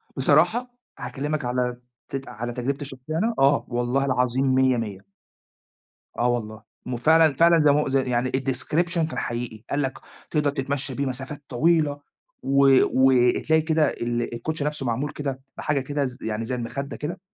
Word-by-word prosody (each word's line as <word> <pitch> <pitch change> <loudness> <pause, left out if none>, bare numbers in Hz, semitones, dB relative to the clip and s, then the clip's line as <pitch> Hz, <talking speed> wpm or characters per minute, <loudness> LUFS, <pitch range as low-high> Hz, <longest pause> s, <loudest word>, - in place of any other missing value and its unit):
بصراحة، 245 +2 +3 0.3
هاكلمِك 145 0 -3
على 125 0 -1 0.3
ت 135 0 -5
على 120 +1 -5
تجربتي 135 +4 -3
الشخصية 135 +3 -5
أنا، 225 +6 +1
آه، 140 +1 +4
والله 120 +3 0
العظيم 130 0 +1
مِيَّة، 130 -1 +3
مِيَّة، 105 -4 -4 1.2
آه، 120 - +2
والله 110 -3 -3 0.3
وفعلًا 155 +4 +4
فعلًا 170 +1 +5
زي 145 - +6
ما 145 - +3
هو - - -1 0.2
يعني 125 +1 0
الdescription 140 +6 0 0.2
كان - - -5
حقيقي. 120 -2 -4
قال 145 - 0
لك 135 -1 -3 0.3
تقدر 150 -2 +1
تتمشى 140 -1 -3
بيه 140 +2 -2
مسافات 135 +3 -5
طويلة، 150 +2 +2 0.4
و 140 0 +4 0.2
وتلاقي 130 +4 +3
كده 160 -2 +2
ال 120 0 -3
الكوتشي 150 +5 -3
نفسه 150 -2 -3
معمول 125 +5 -1
كده 135 -3 -4 0.2
بحاجة 150 -2 0
كده 145 +1 -2
ز 125 -1 -5
يعني 110 0 -3
زي 125 +2 -3
المخدة 130 +4 -5
كده، 170 +5 -5
135 Hz, 160 wpm, -24 LUFS, 125-150 Hz, 1.2 s, زي